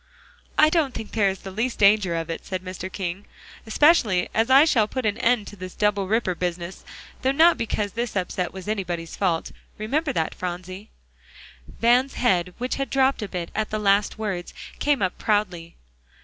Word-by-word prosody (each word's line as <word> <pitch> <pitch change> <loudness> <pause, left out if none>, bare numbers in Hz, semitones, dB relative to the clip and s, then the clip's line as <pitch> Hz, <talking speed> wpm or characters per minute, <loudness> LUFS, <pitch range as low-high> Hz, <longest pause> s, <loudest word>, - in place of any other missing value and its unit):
"I 310 - +6
don't 310 -6 +1
think 220 - -6
there 205 -3 +2
is 190 -1 -5
the 195 - -8
least 230 +6 -2
danger 200 -4 +4
of 165 0 -3
it," 165 - -5
said 185 -1 -5
Mr. 185 0 -6
King, 190 +1 -4 0.4
"especially 220 - +3
as 225 +3 +1
I 270 +3 +7
shall 225 -9 +3
put 260 +1 -4
an 210 -1 0
end 235 -3 +2
to - - -11
this 185 -1 -9
double 205 -2 +1
ripper 215 -2 +1
business, 175 +1 -4 0.4
though 260 - +2
not 330 +5 +5
because 210 -2 -2
this 235 +1 -4
upset 180 -1 -2
was 190 +1 -9
anybody's 175 -6 -3
fault; 175 -5 -1 0.3
remember 275 +8 -1
that, 160 -10 -1
Phronsie." 185 +3 -6 0.8
Van's 245 - +2
head 180 -6 +1
which 250 +1 -3
had 275 0 -2
dropped 270 -1 +2
a 210 - -3
bit 175 -3 -5
at 215 0 -2
the 215 - -2
last 205 0 +2
words, 195 -5 -4 0.2
came 285 -7 +1
up 185 - -2
proudly. 185 -6 -1
205 Hz, 185 wpm, -24 LUFS, 185-240 Hz, 0.8 s, I